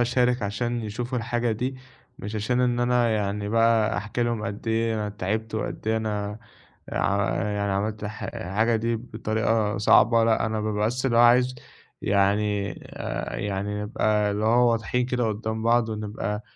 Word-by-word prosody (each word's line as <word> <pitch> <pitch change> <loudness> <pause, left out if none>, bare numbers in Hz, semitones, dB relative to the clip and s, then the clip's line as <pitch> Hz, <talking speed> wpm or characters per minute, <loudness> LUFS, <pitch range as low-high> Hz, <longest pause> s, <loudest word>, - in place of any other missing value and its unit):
أشارك 125 0 +2
عشان 120 +4 -2
يشوفوا 120 +4 -3
الحاجة 120 0 -1
دي، 125 +4 -3 0.4
مش 105 +2 -6
عشان 120 +4 0
إن 120 -1 +1
أنا 120 -1 +2
يعني 105 -1 -1
بقى 115 0 +3
أحكي 110 +3 -2
لهم 120 -2 -1
قدّ 105 +1 -6
إيه 115 0 +1
أنا 105 -1 -2
تعبت 110 +2 -3
وقدّ 110 - -4
إيه 110 - +2
أنا 105 -1 -3 0.5
ع 100 0 +1
يعني 105 -1 -1
عملت 105 +2 -2
ح 105 +1 -6
الحاجة 110 +6 0
دي 115 +1 0
بطريقة 110 -1 -1
صعبة، 115 +2 +5
لأ، 110 -2 +2
أنا 110 -1 -2
بابقى 105 0 0
بَس 125 +3 -1
اللي 120 -3 +1
هو - - +7
عايز 125 +2 +5 0.5
يعني 100 +1 +1
آآ، - - -5
يعني 105 +1 -3
نبقى 105 0 +1
اللي 105 +1 -1
هو 120 +2 +4
واضحين 115 +2 0
كده 125 -2 0
قُدّام 110 +1 -3
بعض، 115 0 +3
ونبقى 105 -1 -4
110 Hz, 165 wpm, -25 LUFS, 105-120 Hz, 0.5 s, هو